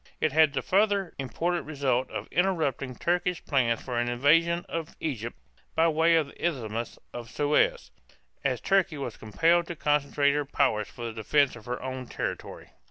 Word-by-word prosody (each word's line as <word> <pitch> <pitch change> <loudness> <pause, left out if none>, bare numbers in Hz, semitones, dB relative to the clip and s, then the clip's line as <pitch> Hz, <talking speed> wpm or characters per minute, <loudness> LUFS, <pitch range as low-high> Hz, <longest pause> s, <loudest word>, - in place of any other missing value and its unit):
It 155 - +1
had 155 0 +4
the 135 - -2
further 200 -2 +2
important 165 +6 -2
result 135 -4 0
of - - -5
interrupting 160 -8 0
Turkish 175 +4 -1
plans 120 -5 +1
for 125 -2 -2
an 120 0 0
invasion 165 +7 +3
of 165 -1 -5
Egypt 120 -7 -4 0.4
by 165 +1 +4
way 165 +1 +4
of 160 -2 +3
the 140 - -14
Isthmus 120 -8 -2 0.2
of 120 -1 -7
Suez, 150 - +1 0.5
as - - 0
Turkey 195 -5 +2
was 135 -5 -5
compelled 165 - +2
to 175 - -5
concentrate 145 -1 +2
her 150 0 0
power 135 -6 +1
for 120 - -10
the 115 - -4
defense 130 +6 +2
of 115 -2 -13
her 125 0 -3
own 130 -1 -5
territory. - - -5
145 Hz, 170 wpm, -28 LUFS, 125-165 Hz, 0.5 s, had